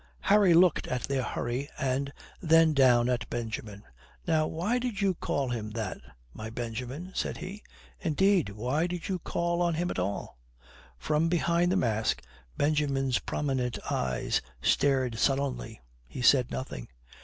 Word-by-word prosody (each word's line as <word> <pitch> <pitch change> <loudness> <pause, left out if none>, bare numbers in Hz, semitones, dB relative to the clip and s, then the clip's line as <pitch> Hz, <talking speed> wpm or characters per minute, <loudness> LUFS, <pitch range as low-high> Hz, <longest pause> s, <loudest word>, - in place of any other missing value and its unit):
Harry 200 -4 +5
looked 175 -1 +4
at 125 -1 -2
their 135 -1 0
hurry 125 +2 -3
and 135 +1 -1 0.3
then 165 -1 +5
down 125 -4 +5
at 120 -3 -1
Benjamin. 110 -3 -5 0.4
"Now 155 -1 +2
why 205 +10 0
did 240 -5 -3
you 195 -2 +2
call 140 -5 -2
him 110 -3 -3
that, 105 -4 -3 0.3
my 110 0 -6
Benjamin?" 125 +9 -5
said - - -2
he. 200 +3 -7 0.4
"Indeed, 190 - +2
why 125 - -1
did 180 0 -5
you 185 -2 -1
call 170 +1 -1
on 170 -2 +2
him 175 +2 -1
at - - -3
all?" 90 -9 -3 0.6
From 150 - +1
behind 170 +1 +2
the 190 - +2
mask 110 - 0 0.3
Benjamin's 140 -3 +1
prominent 130 -4 -2
eyes 65 -1 0 0.2
stared 130 - +2
sullenly. 135 -5 0 0.3
He 125 - -6
said 125 -1 +5
nothing. 65 - -5
140 Hz, 145 wpm, -29 LUFS, 120-170 Hz, 0.6 s, Harry